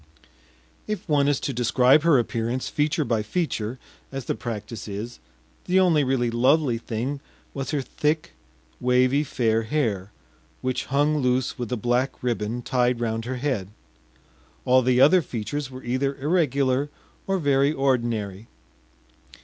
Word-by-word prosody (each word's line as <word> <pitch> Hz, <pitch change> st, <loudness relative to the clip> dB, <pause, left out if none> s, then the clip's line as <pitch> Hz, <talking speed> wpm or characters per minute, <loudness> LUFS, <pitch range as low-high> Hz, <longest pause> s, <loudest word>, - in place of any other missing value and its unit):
If 210 Hz, -4 st, -4 dB
one 145 Hz, -3 st, +3 dB
is 145 Hz, -1 st, +2 dB
to 140 Hz, -, -2 dB
describe 125 Hz, +4 st, +4 dB
her 165 Hz, -3 st, +5 dB
appearance 120 Hz, +1 st, -1 dB
feature 150 Hz, +1 st, 0 dB
by 115 Hz, -2 st, 0 dB
feature, 120 Hz, -3 st, -2 dB, 0.3 s
as 135 Hz, -2 st, -5 dB
the -, -, 0 dB
practice 110 Hz, -2 st, -6 dB
is, 105 Hz, +4 st, -6 dB, 0.5 s
the 185 Hz, +1 st, +3 dB
only 170 Hz, -6 st, +4 dB
really 130 Hz, -3 st, +1 dB
lovely 130 Hz, +1 st, +2 dB
thing 120 Hz, +5 st, -3 dB, 0.3 s
was 135 Hz, -1 st, -4 dB
her 145 Hz, -3 st, -1 dB
thick 150 Hz, +4 st, -1 dB, 0.5 s
wavy 125 Hz, +3 st, +3 dB
fair 115 Hz, -5 st, +1 dB
hair, 110 Hz, -6 st, -1 dB, 0.5 s
which 130 Hz, -1 st, -2 dB
hung 145 Hz, +3 st, +2 dB
loose 125 Hz, -2 st, 0 dB
with 120 Hz, -2 st, -4 dB
a 125 Hz, -, 0 dB
black 120 Hz, +5 st, -1 dB
ribbon 120 Hz, 0 st, -2 dB
tied 125 Hz, -1 st, +1 dB
round 115 Hz, -1 st, -2 dB
her 130 Hz, +2 st, -3 dB
head; 125 Hz, -8 st, -2 dB, 1.0 s
all 130 Hz, +1 st, +5 dB
the 125 Hz, 0 st, +2 dB
other 160 Hz, +7 st, +6 dB
features 130 Hz, +2 st, -4 dB
were 130 Hz, 0 st, -10 dB
either 135 Hz, +3 st, -1 dB
irregular 140 Hz, -3 st, +1 dB, 0.4 s
or 195 Hz, 0 st, +1 dB
very 140 Hz, -3 st, +2 dB
ordinary. 115 Hz, -7 st, -1 dB
130 Hz, 140 wpm, -24 LUFS, 120-145 Hz, 1.0 s, other